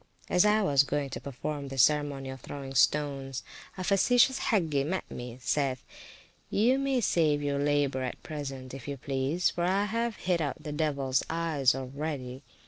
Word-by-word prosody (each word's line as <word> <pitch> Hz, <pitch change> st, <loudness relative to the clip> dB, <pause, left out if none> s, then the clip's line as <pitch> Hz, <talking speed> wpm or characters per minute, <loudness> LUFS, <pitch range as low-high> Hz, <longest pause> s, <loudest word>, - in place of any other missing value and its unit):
As 180 Hz, +2 st, +5 dB
I 210 Hz, +1 st, +4 dB
was 140 Hz, -7 st, +5 dB
going 140 Hz, 0 st, -2 dB
to -, -, -5 dB
perform 140 Hz, +2 st, -5 dB
this 135 Hz, -2 st, +3 dB
ceremony 145 Hz, -3 st, +1 dB
of 130 Hz, -2 st, -9 dB
throwing 135 Hz, +1 st, -7 dB
the -, -, -9 dB
stones, 135 Hz, -2 st, +1 dB, 0.3 s
a 185 Hz, -, -3 dB
facetious 245 Hz, +7 st, +4 dB
Hagge 160 Hz, -10 st, +2 dB
met 185 Hz, +6 st, -2 dB
me; 120 Hz, 0 st, -7 dB
saith 130 Hz, 0 st, 0 dB, 0.7 s
he, 225 Hz, +5 st, +3 dB
You 265 Hz, -, +2 dB
may 275 Hz, -2 st, +1 dB
save 155 Hz, -7 st, +2 dB
your 140 Hz, -1 st, 0 dB
labour 145 Hz, -2 st, +1 dB
at 130 Hz, -1 st, -5 dB
present, 135 Hz, -4 st, -6 dB
if 135 Hz, -2 st, -8 dB
you 140 Hz, -1 st, -4 dB
please, 135 Hz, +6 st, 0 dB
for 175 Hz, -, -2 dB
I 190 Hz, +3 st, +2 dB
have 230 Hz, +1 st, -1 dB
hit 180 Hz, -3 st, 0 dB
out 145 Hz, -4 st, -3 dB
the 150 Hz, -, -5 dB
devils 140 Hz, -4 st, 0 dB
eyes 160 Hz, -6 st, +2 dB
already. 135 Hz, -1 st, -5 dB
145 Hz, 180 wpm, -29 LUFS, 135-175 Hz, 0.7 s, As